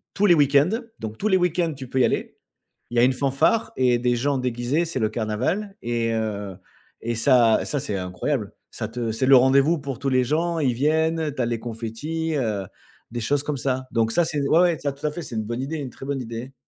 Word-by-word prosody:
Tous 205 Hz, +1 st, +3 dB
les 175 Hz, -, +6 dB
week-ends, 145 Hz, +1 st, +4 dB, 0.3 s
donc 110 Hz, 0 st, -6 dB
tous 215 Hz, -, 0 dB
les 190 Hz, -, +4 dB
week-ends 175 Hz, -2 st, +1 dB
tu 130 Hz, -2 st, -8 dB
peux 130 Hz, -, -1 dB
y -, -, +5 dB
aller. -, -, -1 dB, 0.6 s
Il 120 Hz, -, -2 dB
y -, -, +6 dB
a -, -, +5 dB
une 130 Hz, +1 st, +4 dB
fanfare 135 Hz, -, +1 dB
et 125 Hz, -2 st, +3 dB
des 120 Hz, 0 st, +1 dB
gens 140 Hz, +3 st, 0 dB
déguisés, 125 Hz, +5 st, -1 dB
c'est 165 Hz, -5 st, -3 dB
le 110 Hz, -2 st, +1 dB
carnaval 125 Hz, -, -2 dB
et 115 Hz, -1 st, -1 dB
heu, 105 Hz, -3 st, -3 dB, 0.5 s
et 115 Hz, +1 st, -2 dB
ça 120 Hz, -2 st, +4 dB
ça 145 Hz, -, -2 dB
c'est 105 Hz, -8 st, -3 dB
incroyable. 100 Hz, +6 st, -3 dB, 0.2 s
Ça -, -, -4 dB
te 115 Hz, -1 st, -3 dB
c'est 115 Hz, +4 st, 0 dB
le 135 Hz, +1 st, +7 dB
rendez-vous 135 Hz, +5 st, +4 dB
pour 135 Hz, -3 st, -6 dB
tous 140 Hz, 0 st, -1 dB
les 130 Hz, -1 st, +3 dB
gens, 165 Hz, +6 st, 0 dB
ils 135 Hz, -5 st, +1 dB
viennent, 160 Hz, +3 st, +1 dB
tu 130 Hz, -, -2 dB
as -, -, +1 dB
les 115 Hz, -1 st, -2 dB
confettis, 120 Hz, +9 st, -4 dB
heu, 110 Hz, -8 st, -1 dB, 0.5 s
des 120 Hz, 0 st, -4 dB
choses 140 Hz, +5 st, +1 dB
comme 145 Hz, -1 st, -2 dB
ça 130 Hz, 0 st, -2 dB
donc 115 Hz, -1 st, +1 dB
ça 175 Hz, -, +3 dB
c'est 160 Hz, -2 st, -1 dB
ouais 160 Hz, -, +4 dB
ouais, 175 Hz, -3 st, +3 dB
ça 140 Hz, -, -1 dB
tout 140 Hz, +2 st, -9 dB
à 150 Hz, -, +1 dB
fait, 175 Hz, -, -6 dB
c'est 125 Hz, -, -7 dB
une 110 Hz, -, -1 dB
bonne 120 Hz, +3 st, -4 dB
idée, 155 Hz, +4 st, -3 dB
une 140 Hz, -3 st, -5 dB
très 135 Hz, -, -11 dB
bonne 140 Hz, -1 st, -2 dB
idée. 120 Hz, +2 st, -7 dB
130 Hz, 240 wpm, -23 LUFS, 115-150 Hz, 0.6 s, le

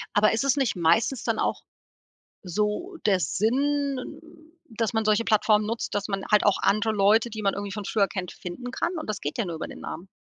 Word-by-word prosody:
Aber 215 Hz, +1 st, +4 dB
ist 225 Hz, +4 st, 0 dB
es 275 Hz, -1 st, +3 dB
nicht 265 Hz, -6 st, +1 dB
meistens 185 Hz, +9 st, +2 dB
dann 225 Hz, -2 st, -1 dB
auch -, -, 0 dB, 0.8 s
so 210 Hz, -, -2 dB
der 195 Hz, -3 st, +4 dB
Sinn, 275 Hz, -, 0 dB, 0.5 s
dass 225 Hz, -1 st, -2 dB
man 220 Hz, -1 st, 0 dB
solche 215 Hz, +2 st, +3 dB
Plattformen 215 Hz, -1 st, +3 dB
nutzt, 230 Hz, +2 st, -3 dB
dass 205 Hz, 0 st, -1 dB
man 195 Hz, -2 st, -3 dB
halt 210 Hz, -, +5 dB
auch 205 Hz, -, +4 dB
andere 215 Hz, +2 st, +2 dB
Leute, 215 Hz, +3 st, +4 dB
die 215 Hz, -1 st, -6 dB
man 195 Hz, -1 st, +1 dB
irgendwie 200 Hz, 0 st, -5 dB
von 205 Hz, 0 st, -5 dB
früher 200 Hz, -3 st, +2 dB
kennt, 185 Hz, -3 st, -5 dB
finden 245 Hz, +8 st, -7 dB
kann? 345 Hz, +6 st, -2 dB
Und 310 Hz, -, -7 dB
das 210 Hz, -1 st, -3 dB
geht 145 Hz, -, -4 dB
ja 235 Hz, -, 0 dB
nur 170 Hz, -2 st, -4 dB
über -, -, -5 dB
den -, -, -10 dB
Namen. 175 Hz, +4 st, -7 dB
215 Hz, 220 wpm, -26 LUFS, 200-235 Hz, 0.8 s, halt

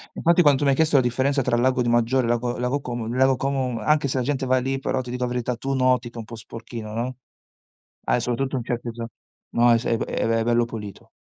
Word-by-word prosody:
Infatti 170 Hz, +1 st, +4 dB
quanto 145 Hz, -2 st, +4 dB
mi 140 Hz, -, +4 dB
hai 135 Hz, -, +2 dB
chiesto 160 Hz, -2 st, +3 dB
la 130 Hz, -, +5 dB
differenza 130 Hz, +3 st, +1 dB
tra 120 Hz, -, +1 dB
Lago 125 Hz, +1 st, +2 dB
di 120 Hz, -, -1 dB
Maggiore 120 Hz, +2 st, +2 dB
e -, -, -2 dB
Lago 120 Hz, +1 st, 0 dB
Lago 125 Hz, +4 st, -1 dB
Como, 120 Hz, -3 st, -5 dB
il 115 Hz, -, -3 dB
Lago 130 Hz, 0 st, +4 dB
Como, 130 Hz, -2 st, -1 dB
anche 145 Hz, +5 st, +2 dB
se 130 Hz, -, -1 dB
la 125 Hz, -, 0 dB
gente 135 Hz, 0 st, -1 dB
va 130 Hz, 0 st, +3 dB
lì 135 Hz, +1 st, -1 dB
però 135 Hz, 0 st, -1 dB
ti 125 Hz, -1 st, -6 dB
dico 125 Hz, 0 st, -2 dB
la -, -, -1 dB
verità, 125 Hz, 0 st, -1 dB
tu 135 Hz, +3 st, -3 dB
noti 130 Hz, -2 st, +2 dB
che -, -, -32 dB
è -, -, -6 dB
un 115 Hz, -, -5 dB
po' 115 Hz, -, -10 dB
sporchino, 115 Hz, 0 st, -8 dB
no. 125 Hz, +3 st, -3 dB, 0.9 s
Ah -, -, +2 dB
soprattutto 125 Hz, +3 st, -2 dB
in 125 Hz, -, -3 dB
certe 120 Hz, 0 st, -3 dB
zo 115 Hz, 0 st, -6 dB, 0.5 s
no 120 Hz, 0 st, +5 dB
è 115 Hz, -, +5 dB
s 115 Hz, -, -6 dB
è 115 Hz, -, +1 dB
b -, -, -2 dB
è -, -, -2 dB
be 115 Hz, 0 st, +1 dB
bello 120 Hz, 0 st, +2 dB
pulito. 105 Hz, -4 st, -9 dB
125 Hz, 270 wpm, -23 LUFS, 120-135 Hz, 0.9 s, la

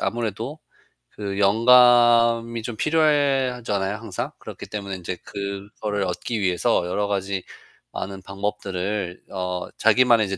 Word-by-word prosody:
아무래도 115 Hz, -, -3 dB, 0.6 s
그 100 Hz, -1 st, -4 dB
영감이 115 Hz, +1 st, +5 dB
좀 115 Hz, +1 st, -5 dB
필요해 145 Hz, -2 st, +2 dB
하잖아요, 105 Hz, -5 st, -2 dB
항상. 110 Hz, -4 st, -5 dB
그렇기 -, -, -9 dB
때문에 100 Hz, -2 st, -5 dB
인제 90 Hz, +1 st, -5 dB
그거를 100 Hz, +1 st, -4 dB
얻기 95 Hz, +5 st, -3 dB
위해서 90 Hz, -2 st, +1 dB
여러 100 Hz, +3 st, -1 dB
가지 100 Hz, -1 st, -2 dB, 0.5 s
많은 95 Hz, 0 st, -6 dB
방법들을 100 Hz, -1 st, -4 dB
어 90 Hz, -1 st, -3 dB
자기만의 115 Hz, -1 st, +4 dB
이제 95 Hz, 0 st, -3 dB
105 Hz, 295 characters per minute, -23 LUFS, 95-120 Hz, 0.6 s, 영감이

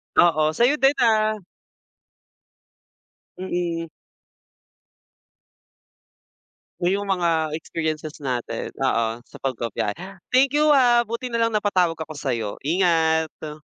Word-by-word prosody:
Oo, 155 Hz, -2 st, +4 dB
sa'yo 245 Hz, -, +3 dB
din, 270 Hz, +2 st, +4 dB
ah. 215 Hz, -1 st, +3 dB, 2.0 s
Mm. 175 Hz, -2 st, -3 dB, 2.9 s
Oh, 175 Hz, -, +2 dB
yung 200 Hz, +1 st, -1 dB
mga 165 Hz, -5 st, 0 dB
experiences 155 Hz, -1 st, -4 dB
natin. 125 Hz, -4 st, -3 dB, 0.2 s
Oo, 115 Hz, -2 st, 0 dB
sa -, -, -14 dB
pagbabiyahe. 115 Hz, -5 st, -3 dB, 0.3 s
Thank 260 Hz, +1 st, +3 dB
you, 300 Hz, -1 st, +5 dB
ha 240 Hz, -3 st, +4 dB
buti 235 Hz, +2 st, -4 dB
nalang 230 Hz, -1 st, +1 dB
napatawag 185 Hz, -5 st, +1 dB
ako 160 Hz, -1 st, -7 dB
sa'yo. 115 Hz, -7 st, -3 dB
Ingat. 160 Hz, -3 st, +1 dB
165 Hz, 95 wpm, -23 LUFS, 150-215 Hz, 2.9 s, you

